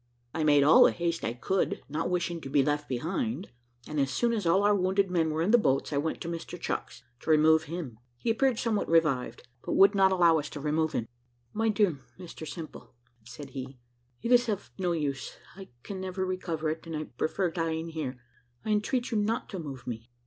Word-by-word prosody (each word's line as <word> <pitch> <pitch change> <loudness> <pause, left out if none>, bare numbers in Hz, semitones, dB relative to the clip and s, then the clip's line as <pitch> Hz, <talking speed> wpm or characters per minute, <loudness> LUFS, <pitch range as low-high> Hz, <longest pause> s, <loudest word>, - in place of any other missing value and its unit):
I 160 - -1
made 145 -2 +5
all 150 +3 +8
the - - +5
haste 170 -1 -2
I 115 - -1
could, 185 +10 -1
not 155 +4 -2
wishing 175 -2 -1
to 135 - -7
be 140 0 +3
left 145 +1 -1
behind; 185 - -2 0.4
and 150 -1 -3
as 135 -1 +2
soon 235 - +1
as 210 -6 -1
all 190 +4 +4
our 205 0 +5
wounded 190 0 +1
men 165 -3 +2
were 155 +1 0
in 195 - +2
the 240 - +7
boats, 135 -4 +1
I - - +1
went 160 +2 -2
to - - -5
Mr 170 -1 -6
Chucks, - - -4 0.2
to - - -8
remove 160 0 +5
him. 150 -9 -6 0.2
He 225 - 0
appeared 255 +1 +2
somewhat 225 -3 0
revived, 155 -7 +1 0.2
but - - -2
would 195 +2 +6
not 195 -1 +4
allow 170 -3 +5
us 145 - -5
to 150 - -7
remove 155 +2 0
him. 115 - -1 0.5
"My 225 +1 +1
dear 200 -9 +2 0.2
Mr 170 -3 -9
Simple," 160 -6 -9 0.3
said 130 +4 -10
he, 130 0 -7 0.5
"it 235 - -1
is 245 -1 +5
of 205 -2 -3
no 180 -2 +1
use; 140 -5 -3 0.2
I 190 0 -10 0.2
can 195 -2 -6
never 185 0 -3
recover 170 -4 -2
it, 160 +1 -7
and 165 -2 -4
I 155 - -3
prefer 160 +6 -2
dying 165 -1 -2
here. 150 -6 -4 0.5
I 215 - -1
entreat 240 +4 0
you 220 - +1
not 220 +3 -1
to 190 - -5
move 135 -6 -7
me. 115 0 -6
165 Hz, 215 wpm, -29 LUFS, 150-195 Hz, 0.5 s, all